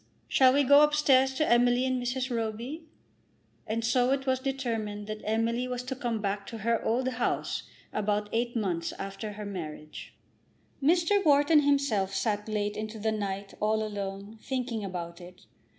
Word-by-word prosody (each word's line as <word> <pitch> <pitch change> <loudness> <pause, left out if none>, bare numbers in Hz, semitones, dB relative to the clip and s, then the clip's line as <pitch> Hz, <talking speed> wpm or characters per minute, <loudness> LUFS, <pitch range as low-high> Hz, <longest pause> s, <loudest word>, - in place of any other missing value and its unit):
Shall 260 -1 +5
we 285 +1 +4
go 285 +2 +7
upstairs 275 -3 +4
to 310 - +1
Emily 245 +1 +4
and 255 -1 0
Mrs. 250 0 -2
Roby?" 230 +8 -4 0.8
And 225 +1 -1
so 245 +2 +3
it 270 0 0
was 260 -1 +1
determined 230 -6 -3
that 215 0 -6
Emily 230 +3 0
was 250 0 -3
to 260 +1 -4
come 240 -3 -2
back 200 -1 -2
to 230 - -6
her 230 +2 0
old 250 +3 +1
house 250 -2 -2 0.2
about 210 0 0
eight 240 +1 0
months 180 -7 -1
after 195 +2 -6
her 210 0 -7
marriage. 155 -6 -7 0.7
Mr. 345 +7 +3
Wharton 295 +1 +5
himself 275 -10 +1
sat 210 0 -1
late 210 -1 -1
into 215 +1 -5
the 220 +1 0
night, 200 -2 -4
all 215 +1 +1
alone, 200 0 -5
thinking 250 -4 -3
about 175 -2 -6
it. 180 +1 -13
230 Hz, 165 wpm, -29 LUFS, 205-260 Hz, 0.8 s, go